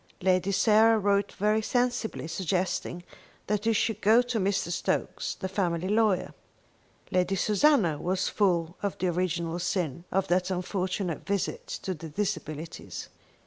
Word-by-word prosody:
Lady 185 Hz, +1 st, +2 dB
Sarah 220 Hz, +3 st, +5 dB
wrote 200 Hz, -1 st, +1 dB
very 210 Hz, +2 st, +1 dB
sensibly, 245 Hz, -6 st, -1 dB
suggesting 180 Hz, 0 st, -2 dB, 0.4 s
that 210 Hz, +1 st, -1 dB
he 225 Hz, -, +3 dB
should 220 Hz, 0 st, 0 dB
go 225 Hz, +4 st, +5 dB
to 245 Hz, -2 st, -2 dB
Mr. 195 Hz, -3 st, 0 dB
Stokes, 175 Hz, -, -1 dB
the 190 Hz, -, -4 dB
family 180 Hz, -2 st, -1 dB
lawyer. 210 Hz, -2 st, +2 dB, 0.8 s
Lady 185 Hz, +1 st, +2 dB
Susanna 210 Hz, -, +3 dB
was 185 Hz, +3 st, 0 dB
full 175 Hz, -4 st, +1 dB
of 200 Hz, -1 st, -2 dB
the 185 Hz, -, -2 dB
original 170 Hz, -1 st, -1 dB
sin 170 Hz, -3 st, -2 dB
of 195 Hz, 0 st, +1 dB
that 180 Hz, +1 st, +1 dB
unfortunate 185 Hz, -1 st, -2 dB
visit 205 Hz, -, -2 dB, 0.2 s
to 190 Hz, -, -2 dB
the 160 Hz, -1 st, -8 dB
Disabilities. 165 Hz, -4 st, -4 dB
190 Hz, 140 wpm, -28 LUFS, 175-210 Hz, 0.8 s, Sarah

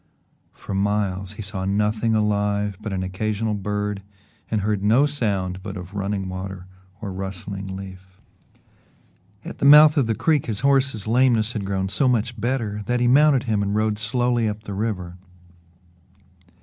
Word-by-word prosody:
For -, -, -8 dB
miles 100 Hz, -1 st, -1 dB
he 110 Hz, -, -7 dB
saw 95 Hz, -1 st, -5 dB
nothing 105 Hz, +3 st, +1 dB
alive 105 Hz, -1 st, 0 dB
but 105 Hz, -1 st, -5 dB
an 95 Hz, -1 st, -2 dB
occasional 105 Hz, +4 st, -2 dB
bird 105 Hz, 0 st, -3 dB, 0.5 s
and 110 Hz, -2 st, 0 dB
heard 105 Hz, 0 st, -1 dB
no 115 Hz, +7 st, +4 dB
sound 100 Hz, -10 st, -2 dB
but 100 Hz, 0 st, -6 dB
of 90 Hz, +1 st, -9 dB
running 100 Hz, -1 st, -2 dB
water 95 Hz, 0 st, -6 dB, 0.4 s
or 100 Hz, -4 st, -5 dB
rustling 95 Hz, 0 st, -6 dB
leaf. 95 Hz, -1 st, -11 dB, 1.3 s
At -, -, -8 dB
the -, -, 0 dB
mouth 150 Hz, +1 st, +8 dB
of 135 Hz, -5 st, +3 dB
the 115 Hz, -, 0 dB
creek 155 Hz, +1 st, +1 dB
his 105 Hz, -3 st, -3 dB
horse's 135 Hz, -6 st, +2 dB
lameness 115 Hz, -1 st, +2 dB
had 105 Hz, -3 st, -3 dB
grown 95 Hz, -1 st, -1 dB
so 105 Hz, +8 st, +1 dB
much 120 Hz, -2 st, 0 dB
better 115 Hz, -4 st, -1 dB
that 125 Hz, 0 st, +1 dB
he 120 Hz, -, +2 dB
mounted 140 Hz, 0 st, +5 dB
him 110 Hz, -5 st, 0 dB
and 100 Hz, 0 st, -1 dB
rode 110 Hz, -1 st, 0 dB
slowly 120 Hz, 0 st, +1 dB
up 105 Hz, +1 st, -6 dB
the 100 Hz, -, -6 dB
river. 95 Hz, -4 st, -3 dB
105 Hz, 160 wpm, -23 LUFS, 95-115 Hz, 1.3 s, mouth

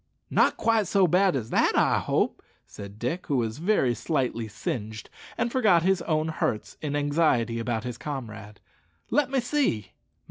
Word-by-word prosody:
"Not -, -, +3 dB
quite 225 Hz, -3 st, +2 dB
so 195 Hz, -2 st, +3 dB
bad 180 Hz, +1 st, +3 dB
as 115 Hz, -4 st, -4 dB
that, -, -, +3 dB
I -, -, +3 dB
hope," -, -, -1 dB, 0.2 s
said 100 Hz, 0 st, -10 dB
Dick, 140 Hz, +11 st, -3 dB
who 145 Hz, -5 st, +1 dB
was 115 Hz, +1 st, -2 dB
very 170 Hz, -, +2 dB
slightly 120 Hz, -3 st, -2 dB
singed, 110 Hz, 0 st, -5 dB, 0.3 s
and 235 Hz, -, 0 dB
forgot 205 Hz, -10 st, +3 dB
his 190 Hz, -1 st, +2 dB
own 155 Hz, -1 st, 0 dB
hurts 115 Hz, -8 st, -2 dB
in 145 Hz, -2 st, -3 dB
anxiety 145 Hz, -6 st, +1 dB
about 115 Hz, -1 st, -2 dB
his 125 Hz, -2 st, -6 dB
comrade. 110 Hz, -7 st, -7 dB, 0.5 s
"Let 295 Hz, -2 st, +2 dB
me 270 Hz, 0 st, +1 dB
see." 245 Hz, -, -1 dB
145 Hz, 165 wpm, -26 LUFS, 115-185 Hz, 0.5 s, Not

